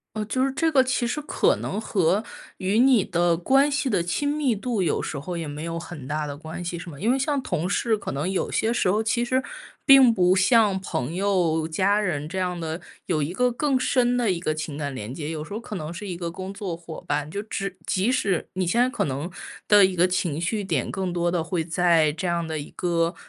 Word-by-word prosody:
哦， 215 -1 -2
就 255 +4 0
是 270 - +1
这 325 +5 +1
个 265 -2 +6
其 255 -2 0
实 300 +5 -2
可 295 - +2
能 200 - -3
和 195 -2 +1 0.4
与 195 +3 0
你 255 -3 +6
的 170 -1 +2
关 270 - +3
系 285 -1 0
的 190 -7 +1
亲 175 +12 -1
密 290 -4 +1
度 220 0 -2
有 175 - +1
时 155 - -4
候 170 +5 -5
也 165 -2 -4
没 145 +1 -6
有 165 0 -3
很 165 -5 -9
大 150 +2 -2
的 145 0 -6
关 160 +3 -7
系， 175 0 -4
是 170 - -8
吗？ 145 -4 -10
因 215 - 0
为 - - +1
像 280 0 0
同 180 -6 -2
事， 220 +2 +1
可 205 - -5
能 145 +6 -2
有 190 - -1
些 225 +1 +1
时 190 -6 +2
候 210 +3 +1
其 225 +2 0
实 255 +2 +1 0.4
并 270 -4 +8
不 185 -3 +3
像 205 +1 +4
朋 155 -4 -3
友、 180 -5 +1
家 190 +6 +2
人 155 -7 -2
这 185 +4 -6
样 180 -1 -2
的， 160 +1 -4 0.2
有 155 - 0
一 145 - -3
个 250 +7 +2
更 270 +1 +1
深 245 -1 +2
的 240 -3 +1
一 185 - +1
个 170 -2 -1
情 155 -2 -5
感 145 -2 -3
连 115 -1 -6
接。 150 0 -5
有 155 -1 -4
时 200 - -9
候 220 - -4
可 215 -3 -6
能 155 0 -5
是 185 +4 -7
一 180 -3 -4
个 170 -1 -3
工 185 +3 -7
作 195 -4 -4
伙 165 -1 -9
伴， 145 +1 -1
就 200 - -3
只 195 -3 -4
即 195 +6 +1
使 195 -9 0
你 185 -1 0
现 235 +8 +2
在 250 - +3
可 - - -1
能 145 +6 -4 0.4
的 205 -2 +8
一 190 -1 -1
个 175 0 +4
情 180 -4 -1
绪 210 +5 -1
点 165 -10 -1
更 190 -2 -2
多 175 0 0
地 175 -1 0
会 165 +1 -2
在 165 -2 +3
这 160 +5 -4
样 170 -1 0
的 160 -1 -3
一 145 - -7
个 170 0 0
180 Hz, 270 characters per minute, -24 LUFS, 165-220 Hz, 0.4 s, 并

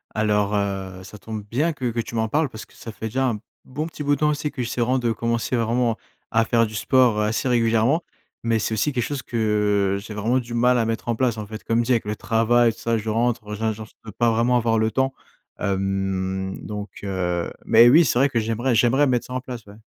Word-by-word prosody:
Alors 105 -1 +1
heu, 95 -2 -3
ça 105 - -11
tombe 110 0 -6
bien 150 +8 +1
que 125 -4 -2
que 115 - -3
tu 115 - -8
m'en 110 0 +1
parles 150 +3 +1
parce 110 - -9
que - - -24
ça 115 - -9
fait 110 - -8
déjà 130 +4 0
un 105 -3 -3 0.2
bon 150 +5 -4
petit 150 -2 -7
bout 145 0 +2
de - - -10
temps 150 0 +3
aussi 150 0 -2
que 125 - -5
j'essaie 120 0 -2
vraiment 130 +2 +2
de 120 -2 0
commencer 115 +2 -1
vraiment 115 0 +1 0.4
à 115 0 +3
faire 115 0 +2
du 110 - -9
sport, 125 -2 +3
heu, - - +2
assez 110 +4 -1
régulièrement. 115 +5 +2 0.4
Mais 115 -1 +1
c'est 110 - -2
aussi 130 +8 +1
quelque 120 -3 -1
chose 145 -3 -4
que 105 -3 +1
j'ai 110 - -8
vraiment 115 +5 +1
du 120 -1 -7
mal 125 +1 +3
à 115 - +1
mettre 115 +1 -3
en 115 - +1
place 120 -2 0
en 105 - -5
fait. 110 0 -8
Comme 115 +1 +1
dit, 130 - -1
avec 115 - +2
le 105 +1 -2
travail, 115 +1 +3
tout - - -17
ça, 115 -1 0
je 110 +1 -4
rentre, 115 -1 0
heu, 105 - -3
je 110 +1 -1
genre 110 0 -7
je - - -24
peux 110 - -9
pas 115 +2 +2
vraiment 120 +2 +2
avoir 115 -1 +1
le 110 0 +1
temps. 130 +3 0 0.5
Hem 95 -1 -1
donc 105 -1 -5
heu, 90 -3 -2 0.2
mais 115 +2 +7
oui, 160 +7 +7
c'est 120 -3 +1
vrai 140 - +5
que 115 - 0
j'aimerais 115 +3 0
j'aimerais 130 +5 +4
mettre 125 -2 0
ça 125 - -7
en 130 - -1
place 125 -4 -8
ouais. 100 - -13
115 Hz, 255 wpm, -23 LUFS, 105-125 Hz, 0.5 s, mais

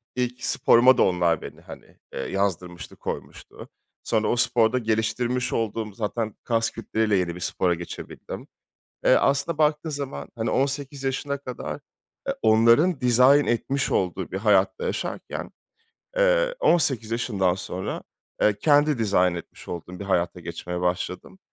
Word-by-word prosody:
ilk 125 0 -2
sporuma 130 0 +5
da - - +5
onlar 85 -3 +2
beni, - - -10
hani, - - -13 0.2
eee, - - -5
yazdırmıştı, 90 -1 -3
koymuştu. - - -8 0.3
Sonra 110 -1 +1
o - - +2
sporda 120 -1 +3
geliştirmiş 120 +3 0
olduğum 110 -2 -2
zaten 110 0 -3
kas 115 -2 +1
kütleyle 110 -2 0
yeni 90 -2 0
bir - - -8
spora 90 0 0
geçebildim. 85 +1 -8 0.6
Eee, - - +6
aslında 140 +3 +1
baktığın 150 +1 +1
zaman, 140 -1 -5
hani 115 0 -2
18 135 0 -1
yaşına 140 +2 -2
kadar 115 - -6 0.5
e, - - +3
onların 115 +9 +4
dizayn 125 +4 +5
etmiş 135 +4 0
olduğu 90 0 -1
bir 95 - -3
hayatta 100 -2 +2
yaşarken, - - -4 0.7
eee, - - +3
18 135 - +2
yaşından 100 -6 +1
sonra, 95 0 -5 0.4
eee, 105 -1 +3
kendi 145 -1 +3
dizayn 90 -5 +2
etmiş 85 - -10
olduğum 90 +1 -7
bir 100 - -4
hayata 90 -2 0
geçmeye 90 +1 -5
başladım 90 - -3
115 Hz, 140 wpm, -25 LUFS, 95-135 Hz, 0.7 s, Eee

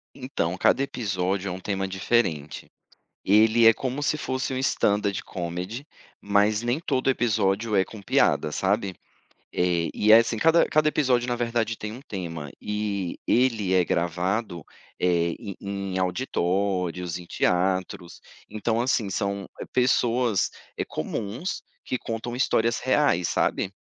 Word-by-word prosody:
Então, 125 -10 -2
cada 135 - +3
episódio 100 -6 -2
é - - -3
uma 90 - -5
tema 95 0 -2
diferente. 95 -6 -1 0.6
Ele 110 +3 +5
é 115 - +9
como 130 +4 -3
se 145 - +1
fosse 130 -3 -3
um - - -2
Stand 105 -5 +2 0.2
Comedy, 90 - -5 0.3
mas 105 +1 +2
nem 120 +4 0
todo 135 -5 0
episódio 110 -3 +1
é 95 - +4
com 110 - -11
piada, 75 -4 +2
sabe. 95 +2 0 0.6
E 90 +4 +1
é 110 - +11
assim 115 0 0
cada 165 +7 +4
cada 155 0 +3
episódio 125 -5 +1
na 120 - 0
verdade 115 -2 -1
tem 105 0 -5
um 125 - -9
tema, 85 - -6
e 105 -3 -3
ele 115 -7 +2
é 90 -1 +4
gravado, 85 +2 -1 0.4
eh, 85 -1 +2
em 100 -5 -7
em 100 -1 -4
auditórios, 90 -3 -1
em 90 - -10
teatros. 90 0 -1 0.3
Então 110 +2 -1
assim 120 -4 0
são 100 +1 -2 0.3
pessoas, 125 -3 +2 0.3
eh, - - -1
comuns, 115 - -4 0.2
que 130 - -2
contam 115 +1 -5
histórias 115 -2 +1
reais, 130 - +2
sabe. 95 - 0
105 Hz, 140 wpm, -25 LUFS, 90-120 Hz, 0.6 s, é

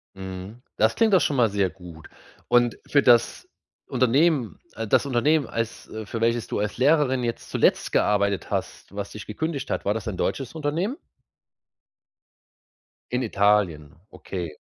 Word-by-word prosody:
Mhm. 95 +4 -8 0.2
Das 110 +1 +3
klingt 225 -2 +3
doch 190 - +7
schon 145 - +1
mal 120 -4 +3
sehr 100 -2 +1
gut. 85 -4 -13 0.4
Und 120 -1 +3
für 145 - +4
das 120 -2 +3 0.4
Unternehmen 130 +1 +2 0.2
äh, 115 - -4
das 105 - +3
Unternehmen 140 +3 +2
als 115 -1 -4
äh, 110 0 -7
für 115 +2 -5
welches 115 0 +1
du - - -3
als 105 0 -2
Lehrerin 130 -1 +3
jetzt 115 -1 -4
zuletzt - - +2
gearbeitet 100 -3 +1
hast, - - -5
was 100 0 -5
dich 105 - -9
gekündigt 145 +5 -4
hat, - - -2
war 100 - +2
das 115 +1 -5
ein 100 -4 -4
deutsches 135 - -2
Unternehmen? 160 - -1 2.2
In 125 +1 0
Italien, 100 - +1 0.2
okay. 85 -5 -6
115 Hz, 155 wpm, -24 LUFS, 100-135 Hz, 2.2 s, doch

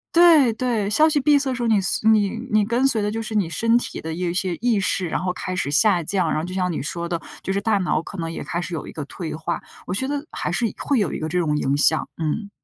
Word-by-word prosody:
对， 325 -8 +6
对， 230 -3 -1
消 310 +9 +5
息 300 -2 +2
闭 290 +1 +4
塞 265 -2 -2
时 245 - -3
候， - - +1
你 215 -3 +3
随 190 +3 0
你 215 -2 +4 0.2
你 215 0 +4
跟 235 +5 +1
随 230 -5 +1
的 205 - 0
就 220 +2 -3
是 220 - -5
你 200 -6 +1
身 230 +6 +1
体 - - -5
的 160 0 -5
一 175 +1 -2
些 180 0 -1
意 235 -3 +2
识， 185 -1 0
然 - - -1
后 180 0 -2
开 185 0 -5
始 145 -5 -1
下 180 +2 +5
降， 185 0 0
然 - - 0
后 155 - -2
就 180 - -7
像 180 -1 -1
你 155 - -3
说 170 +3 -4
的， 170 -1 -2 0.2
就 190 - -3
是 195 - 0
大 205 0 +1
脑 180 - 0
可 - - -10
能 165 -1 -3
也 - - -6
开 170 - -3
始 175 -1 -5
有 155 - -5
一 - - -9
个 155 - -6
退 160 +2 -6
化， 165 +2 -3 0.3
我 - - -2
觉 260 +8 -1
得 285 0 -3
还 - - -3
是 240 - 0
会 280 -4 0
有 200 -6 0
一 - - -4
个 155 - -3
这 180 +3 0
种 150 -3 0
影 140 -1 0
响， 155 +2 +3
嗯。 165 +6 -3
195 Hz, 315 characters per minute, -22 LUFS, 170-230 Hz, 0.3 s, 对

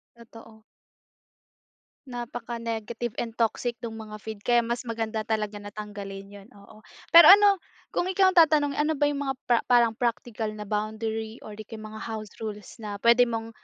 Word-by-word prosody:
Totoo. 225 -1 -15 1.5
Napaka-negative 235 -1 -5
and 230 -1 -3
toxic 235 +1 0
no'ng 225 -1 -6
mga 215 -1 -8
feed 220 -2 -7
kaya 240 -1 +4
mas 235 +1 -3
maganda 225 -1 -3
talaga 215 -1 -2
na 205 0 -10
tanggalin 200 -2 -8
'yon, 200 0 -13
oo. 200 +1 -16 0.3
Pero 335 -1 +10
ano, 405 -1 +5 0.3
kung - - -1
ikaw 375 +1 +3
ang 370 - -4
tatanungin, 295 -3 +4
ano 300 +2 +1
ba 290 -1 +1
'yong 285 -1 -3
mga 270 - -1 0.2
pra 240 - +5
parang 235 -2 +3
practical 230 -2 -2
na 210 -1 -8
boundary 220 +1 -3
or 210 -1 -10
'di 215 - -8
kaya 220 0 -9
mga 215 0 -9
house 220 -2 -6
rules 210 0 -7
na 205 -3 -7
puwede 235 +1 +6
mong, 225 -1 -4
225 Hz, 170 wpm, -26 LUFS, 215-240 Hz, 1.5 s, Pero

